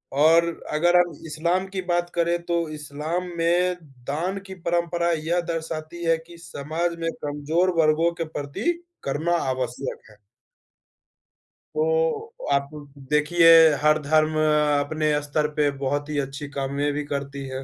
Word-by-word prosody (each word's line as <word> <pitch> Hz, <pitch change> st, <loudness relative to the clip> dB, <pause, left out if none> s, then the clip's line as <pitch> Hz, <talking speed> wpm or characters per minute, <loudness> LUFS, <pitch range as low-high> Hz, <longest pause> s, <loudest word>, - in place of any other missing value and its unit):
और 165 Hz, +3 st, +5 dB, 0.3 s
अगर 175 Hz, +3 st, +3 dB
हम 175 Hz, 0 st, +4 dB, 0.2 s
इस्लाम 170 Hz, +4 st, 0 dB
की 190 Hz, -1 st, -4 dB
बात 175 Hz, 0 st, +1 dB
करें, 170 Hz, 0 st, +2 dB
तो 170 Hz, -1 st, -1 dB
इस्लाम 150 Hz, +4 st, -4 dB
में 175 Hz, +2 st, +2 dB, 0.3 s
दान 175 Hz, +7 st, -2 dB
की 190 Hz, -, -7 dB
परंपरा 170 Hz, 0 st, +1 dB
यह 165 Hz, +2 st, 0 dB
दर्शाती 165 Hz, 0 st, -4 dB
है 165 Hz, 0 st, +3 dB
कि 170 Hz, +1 st, -14 dB
समाज 165 Hz, +1 st, -3 dB
में 165 Hz, 0 st, -1 dB
कमज़ोर 150 Hz, +5 st, 0 dB
वर्गों 160 Hz, +2 st, +3 dB
के -, -, +2 dB
प्रति 145 Hz, -, -1 dB, 0.3 s
करुणा 160 Hz, +5 st, 0 dB
आवश्यक 130 Hz, 0 st, -3 dB
है। 105 Hz, -, -19 dB, 1.6 s
तो 470 Hz, -1 st, 0 dB, 0.2 s
आप 140 Hz, 0 st, +1 dB, 0.4 s
देखिए, 155 Hz, +3 st, +4 dB, 0.3 s
हर 150 Hz, 0 st, +4 dB
धर्म 155 Hz, +1 st, +2 dB, 0.5 s
अपने 155 Hz, +1 st, 0 dB
स्तर 150 Hz, +1 st, 0 dB
पे 150 Hz, -1 st, +3 dB
बहुत 145 Hz, +2 st, -1 dB
ही 150 Hz, -, -2 dB
अच्छी 140 Hz, +1 st, -4 dB
कामें 140 Hz, +1 st, -1 dB
भी 150 Hz, -, -2 dB
करती 140 Hz, -1 st, -4 dB
है। 130 Hz, 0 st, -5 dB
160 Hz, 140 wpm, -24 LUFS, 145-175 Hz, 1.6 s, और